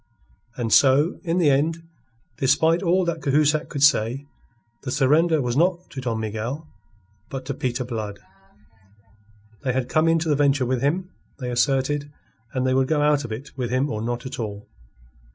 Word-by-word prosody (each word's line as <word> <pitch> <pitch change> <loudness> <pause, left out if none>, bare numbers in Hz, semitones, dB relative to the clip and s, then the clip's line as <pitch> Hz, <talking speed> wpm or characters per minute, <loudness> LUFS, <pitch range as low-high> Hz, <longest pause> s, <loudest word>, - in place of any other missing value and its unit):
And 115 -3 -1
so, 140 +5 +4
in 170 -1 -1
the 160 -5 +4
end, 160 +4 0 0.5
despite 160 +6 +3
all 185 0 +2
that 170 -1 -2
Cahusac 150 +2 +2
could 140 -2 -2
say, 135 -1 +3 0.6
the 135 - -6
surrender 150 +3 +3
was 120 -1 -1
not 175 +3 +1
to 130 - -6
Don 115 -3 -2
Miguel, 110 +8 -4 0.6
but 135 -1 -6
to 140 - -3
Peter 125 0 -2
Blood. 110 -4 -5 1.5
They 130 -3 0
had 130 -1 -2
come 155 +1 +2
into 165 0 +2
the 150 - +3
venture 140 -2 +2
with 125 0 -1
him, 180 +6 -1 0.3
they 125 -3 -4
asserted, 135 +3 0 0.4
and 130 -1 -1
they 130 - +2
would 130 0 +2
go 150 -1 +1
out 150 -1 +3
of 120 - -7
it 120 +6 -7
with 125 -3 -3
him 130 +4 0
or 110 - -3
not 120 +2 -3
at 130 - -6
all. 105 -2 -5
135 Hz, 175 wpm, -23 LUFS, 125-155 Hz, 1.5 s, so